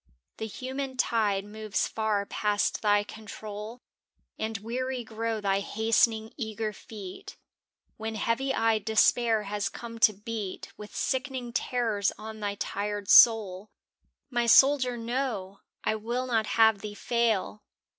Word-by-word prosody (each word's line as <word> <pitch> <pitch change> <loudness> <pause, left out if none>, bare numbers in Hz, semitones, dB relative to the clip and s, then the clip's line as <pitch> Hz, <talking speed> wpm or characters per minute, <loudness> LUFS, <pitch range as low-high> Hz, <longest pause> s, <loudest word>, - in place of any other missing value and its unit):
The 220 - -4
human 260 +3 -5
tide 210 -5 +1
moves 215 0 -2
far 215 -2 -1
past 205 0 0
thy 205 -1 +3
control 215 +2 -8 0.6
And 220 0 -2
weary 250 +4 -3
grow 225 0 -3
thy 195 -1 +1
hastening, 220 +1 +1
eager 220 -3 -3
feet, 215 - -10 0.6
When 220 0 -4
heavy 230 +6 0
eyed 225 -4 +1
despair 220 +1 +3
has 205 0 -2
come 230 -1 -9
to 215 - +6
beat 210 -1 -6
With 210 0 -11
sickening 260 -2 -2
terrors 225 -6 0
on 220 0 -8
thy 205 -1 -2
tired 205 0 -3
soul. 210 -3 +6 0.6
My 240 -1 +1
soldier, 260 0 +5
no! 230 -5 -3 0.2
I - - +1
will 235 +4 -2
not 225 -4 0
have 220 -2 +4
thee 205 0 -7
fail! 220 -2 0
220 Hz, 130 wpm, -28 LUFS, 210-235 Hz, 0.6 s, to